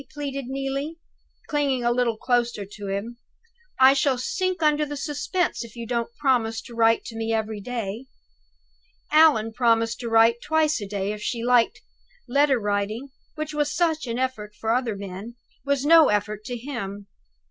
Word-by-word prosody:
pleaded 275 -3 -4
Neelie, 275 +4 -3 0.5
clinging 280 -4 0
a 240 - +2
little 240 -2 +1
closer 240 -4 0
to 205 0 -9
him. 200 +5 -4 0.6
"I 265 +1 +8
shall 275 -1 +2
sink 370 - -2
under 300 0 +3
the 290 -1 -4
suspense, 305 +3 -1
if 230 -1 -12
you 235 -1 -6
don't 235 0 -2
promise 240 -5 +1
to 240 - -12
write 230 0 +3
to 225 - -8
me 225 0 -2
every 220 -1 -2
day." 230 +1 -5 1.0
Allan 300 -8 +5
promised 230 -1 +2
to 235 - -4
write 225 +1 +4
twice 310 -5 +1
a 205 - -5
day, 200 0 -2
if 210 0 -6
she 230 +1 -3
liked 245 -1 +3 0.5
letter 280 0 +3
writing, 210 +5 -2 0.3
which 310 0 -4
was 295 -1 0
such 320 -3 0
an 235 0 -2
effort 235 -5 -3
to 220 - -7
other 235 -2 +1
men, 200 +4 -8 0.3
was 280 -1 0
no 325 0 +7
effort 210 0 -1
to 245 - -4
him! 225 -6 -6
240 Hz, 170 wpm, -24 LUFS, 220-280 Hz, 1.0 s, I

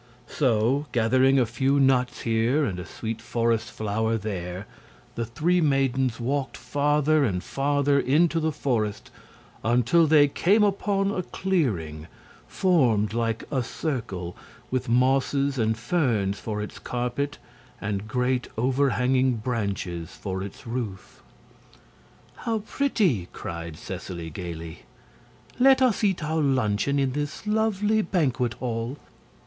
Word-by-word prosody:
So, 130 +3 +1
gathering 130 +3 +4
a 125 - +4
few 135 +5 +1
nuts 125 -2 +2
here 115 +6 +2
and 90 -7 -3
a 90 - -7
sweet 115 0 -5
forest 115 -1 0
flower 110 +1 -1
there, 95 -3 -5 0.5
the 115 -1 -3
three 170 +9 +1
maidens 135 -4 +1
walked 135 +3 -2
farther 145 +3 +2
and 90 -8 -1
farther 140 +2 +1
into 160 +6 +3
the 160 0 0
forest 120 -8 -2 0.5
until 125 +9 +3
they 150 -1 +6
came 200 +9 +3
upon 200 0 +1
a 190 - -1
clearing 105 - -2 0.4
formed 120 - +2
like 115 -1 -1
a 135 -3 +1
circle 110 - -4 0.4
with 130 -2 -1
mosses 135 +2 +2
and 110 0 +1
ferns 110 - 0
for 105 -1 -3
its 105 - -8
carpet 125 +4 -3 0.4
and 105 -1 -3
great 125 +2 0
overhanging 130 0 +2
branches 100 -8 -3
for 95 -2 -4
its 100 0 -8
roof. 115 -6 -5 1.2
"How 225 -3 -2
pretty!" 195 - +1
cried 85 -1 -6
Seseley, 90 -2 -6
gaily. 85 -1 -7 0.8
"Let 265 +1 +6
us 250 -5 +2
eat 190 -5 +1
our 160 +1 0
luncheon 130 -1 +1
in 135 -2 +1
this 145 +7 -4
lovely 215 0 +1
banquet 130 - 0
hall!" 120 +2 -3
125 Hz, 125 wpm, -25 LUFS, 110-145 Hz, 1.2 s, they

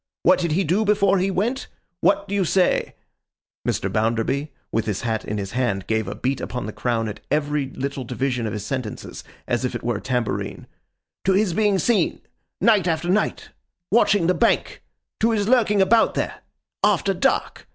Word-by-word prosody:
What - - +5
did 170 -3 0
he 190 +5 +2
do 185 +7 +1
before 200 -2 +3
he 190 +2 +1
went? 220 +8 -1 0.3
What 305 0 +2
do - - -5
you 200 -1 +2
say;' 185 +1 +1 0.7
Mr. - - 0
Bounderby, 115 +7 0 0.2
with 115 - -1
his 105 -2 -2
hat 110 -3 -1
in 105 - -4
his 100 -1 -4
hand, 120 -6 -1
gave 110 -1 0
a 105 - -4
beat 130 +5 -2
upon 125 -4 -4
the 110 - -6
crown 115 -2 -1
at 105 0 -6
every 145 -1 0
little 135 0 -4
division 125 -1 -2
of 105 - -4
his 105 -1 -5
sentences, 130 -3 -5 0.2
as 120 +1 0
if 125 -1 -2
it 120 - -5
were 120 -2 0
a - - -8
tambourine; 125 -3 -2 0.6
'to 190 - +3
his 195 -2 +2
being 205 0 +2
seen—night 215 -2 0
after 165 +1 0
night—watching 200 0 0
the 180 - +3
Bank?—to 230 0 -1
his 210 -3 0
lurking 215 -5 +4
about 225 +4 +3
there—after - - -1
dark? - - 0
150 Hz, 170 wpm, -23 LUFS, 120-200 Hz, 0.7 s, What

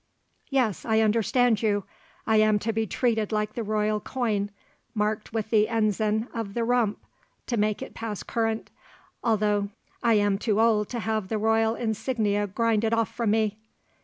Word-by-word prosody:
"Yes, 250 - +1
I 220 -1 +2
understand 225 +1 +2
you. 205 -3 +1 0.4
I 220 - +3
am 215 -1 +4
to 225 +2 -2
be 220 0 0
treated 225 -1 0
like 210 0 -1
the 235 - -3
royal 215 0 0
coin, 210 -5 -1 0.5
marked 210 0 -1
with 220 -1 -3
the 215 -1 +4
ensign 220 0 +1
of 220 -4 -4
the 235 - 0
Rump 235 -3 +1 0.5
to 240 - -2
make 210 -1 0
it - - -9
pass 220 -3 -5
current, 225 -1 -2 0.5
although 210 -3 +1 0.3
I 235 -2 +4
am 205 -1 +2
too 215 -1 +1
old 220 -2 +3
to 240 -2 -3
have 220 -3 -1
the 220 - -1
royal 225 +1 +2
insignia 220 -3 -1
grinded 225 +2 +1
off 230 -3 0
from 235 -3 -1
me. 215 -1 +1
220 Hz, 165 wpm, -26 LUFS, 210-230 Hz, 0.5 s, am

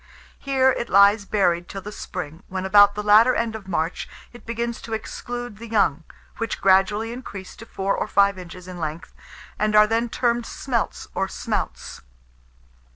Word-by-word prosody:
Here 265 -1 +3
it 240 - -3
lies 200 +1 +5
buried 175 -4 +1
till 195 -1 -7
the 210 - -7
spring, 170 -5 -7
when, 185 0 -4
about 205 +1 +6
the 210 - -3
latter 215 +4 +6
end 230 -1 -1
of 205 -3 -9
March, 165 -2 -2 0.2
it 240 - -15
begins 235 0 -3
to 225 - -7
exclude 240 0 -6
the 230 - -8
young, 175 -8 +1 0.3
which 230 - -3
gradually 195 +4 +3
increase 200 -7 -9
to 225 - -11
four 195 -1 -1
or - - -2
five 200 -1 +3
inches 180 0 -10
in 180 -1 -8
length, 155 +1 -5 0.5
and 215 0 +1
are 210 0 +8
then 230 +2 0
termed 235 0 0
smelts 240 -5 -3
or - - -1
smouts. - - -4
205 Hz, 170 wpm, -23 LUFS, 185-230 Hz, 0.5 s, are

